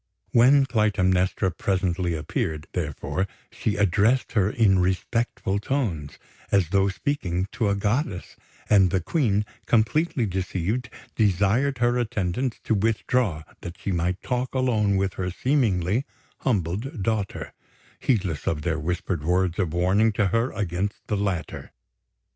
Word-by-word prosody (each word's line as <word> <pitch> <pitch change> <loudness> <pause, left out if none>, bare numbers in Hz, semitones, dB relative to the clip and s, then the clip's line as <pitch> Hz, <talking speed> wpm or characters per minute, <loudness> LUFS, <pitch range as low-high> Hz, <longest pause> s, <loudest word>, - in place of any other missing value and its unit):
When 135 +4 +6
Clytemnestra 95 -5 +1
presently 90 -3 -1
appeared, 75 0 -3
therefore, 75 +1 -2 0.2
she 105 - -2
addressed 105 +5 +2
her 100 -4 +2
in 105 -4 +3
respectful 95 +2 0
tones, 100 - -2 0.3
as 95 -5 +3
though 95 +1 +3
speaking 95 - -2
to 110 -4 0
a 100 - +2
goddess; 105 - -1 0.3
and 95 -3 +5
the 95 - +1
Queen, 105 - +1 0.2
completely 120 +4 +2
deceived, 95 +5 -2 0.3
desired 110 +7 +2
her 120 0 +2
attendants 115 +1 -1
to - - 0
withdraw 110 -4 +1 0.2
that 85 0 -8
she 100 - -3
might 90 +1 -1
talk 125 +1 -2
alone 110 -6 +2
with 95 -1 0
her 90 - -1
seemingly 110 - +1 0.4
humbled 105 - -1
daughter, 105 -2 -2 0.5
heedless 95 - 0
of 75 -2 -1
their 80 -1 0
whispered 85 0 -2
words 90 +2 +1
of 90 -5 0
warning 95 +6 +3
to 100 -1 +1
her 115 +6 +1
against 100 0 -3
the 105 - -1
latter. 100 -4 -3
100 Hz, 130 wpm, -25 LUFS, 90-115 Hz, 0.5 s, When